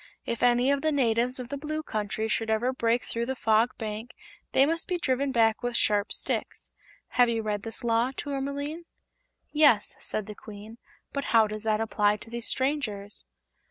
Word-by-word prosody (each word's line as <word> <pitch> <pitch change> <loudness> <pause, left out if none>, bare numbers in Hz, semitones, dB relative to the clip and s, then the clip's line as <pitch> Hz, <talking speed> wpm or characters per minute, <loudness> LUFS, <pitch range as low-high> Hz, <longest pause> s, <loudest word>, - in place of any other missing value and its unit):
If 235 - -3
any 245 +2 +4
of 280 -1 +1
the 315 - +1
natives 250 -2 +1
of 250 -1 -6
the 280 - -4
Blue 310 +2 -4
Country 215 -2 -2
should 225 0 -1
ever 235 +4 +1
break 235 -1 +1
through 235 0 -3
the 265 - -2
Fog 225 +1 +2
Bank 220 +2 -6 0.4
they 270 - +5
must 330 +3 -1
be 360 - 0
driven 275 -4 0
back 225 -3 +3
with 245 -1 0
sharp 205 -1 +3
sticks.' - - -1 0.4
Have 245 -1 +4
you 225 -1 -1
read 210 -1 -2
this 225 +4 -3
Law, 230 +1 +2
Tourmaline?" 285 +4 -4 0.7
"Yes," 290 -9 +4
said 215 - -2
the 210 - -7
Queen; 215 +2 -11 0.3
"but 280 0 -2
how 225 0 +5
does 215 0 -5
that 215 -1 +1
apply 210 -2 +1
to 225 - -13
these 235 -1 -2
strangers?" 240 -8 -2
235 Hz, 185 wpm, -27 LUFS, 220-270 Hz, 0.7 s, they